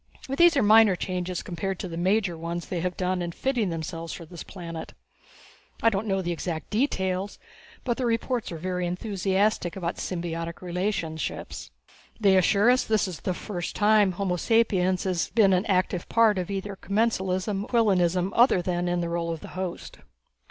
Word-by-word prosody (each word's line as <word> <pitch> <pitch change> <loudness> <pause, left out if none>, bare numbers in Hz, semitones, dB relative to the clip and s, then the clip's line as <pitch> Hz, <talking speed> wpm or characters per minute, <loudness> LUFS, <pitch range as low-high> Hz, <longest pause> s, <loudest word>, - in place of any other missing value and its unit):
These 340 0 +5
are 265 - +4
minor 215 -2 +6
changes, 180 0 -3
compared 185 +2 -3
to 185 - -5
the 165 - -6
major 185 +1 +1
ones 170 +1 -4
they 180 - -3
have 180 +1 -2
done 185 0 0
in 175 -1 -3
fitting 240 0 -1
themselves 165 0 -5
for 170 - -8
this 170 0 -10
planet. 170 -3 -8 0.9
I 230 - +5
don't 205 +2 -2
know 195 -1 0
the 175 - -2
exact 165 -1 -4
details, 195 -5 -1 0.5
but 240 -2 -1
the 255 - 0
reports 230 0 -1
are 165 - -5
very 180 +1 -2
enthusiastic 190 0 0
about 175 -3 -3
symbiotic 170 -1 -4
relationships. 180 -3 -3 0.5
They 200 -3 +4
assure 200 +5 +4
us 255 - +3
that 220 - -3
this 210 - +1
is 175 -5 -6
the 185 - -2
first 175 -4 -5
time 210 -2 +4
homo 180 -1 -1
sapiens 190 -4 +2
has 180 -3 -1
been 200 -3 +4
an 185 +4 +1
active 185 -2 0
part 220 -4 +4
of 180 - -4
either 200 0 -4
commensalism 195 -1 -1
or - - -13
inquilinism 185 -5 +2
other 240 -5 +5
than 175 0 -1
in 175 0 0
the 170 - -2
role 170 0 -2
of 165 - -6
host." 185 -1 -6
185 Hz, 180 wpm, -26 LUFS, 175-210 Hz, 0.9 s, minor